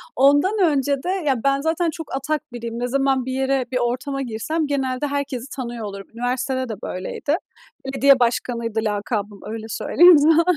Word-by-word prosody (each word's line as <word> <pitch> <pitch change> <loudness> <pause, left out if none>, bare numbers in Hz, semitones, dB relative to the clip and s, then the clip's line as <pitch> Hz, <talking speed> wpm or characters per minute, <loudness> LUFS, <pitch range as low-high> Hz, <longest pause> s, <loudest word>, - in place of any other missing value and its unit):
Ondan 290 - +4
önce 285 -3 +2
de, 360 - -2 0.2
ya 265 - +3
ben 275 0 +2
zaten 325 +2 +1
çok 315 -3 -6
atak 300 +2 -1
biriyim, 235 0 -5
ne 245 - -1
zaman 270 -1 +1
bir 260 - -3
yere, 265 -1 0
bir 250 - 0
ortama 255 +3 -1
girsem 270 +7 -2
genelde 270 0 -1
herkesi 275 -3 -3
tanıyor 240 -4 -5
olurum. 200 -1 -7
Üniversitede 255 +1 -2
de - - -2
böyleydi. 285 - -2 0.5
"Belediye 270 0 +4
başkanı"ydı 235 -2 0
lakabım, 205 -1 -2
öyle 220 -1 -5
söyleyeyim 345 - +6
sana. 320 +3 +5
265 Hz, 165 wpm, -22 LUFS, 235-285 Hz, 0.5 s, söyleyeyim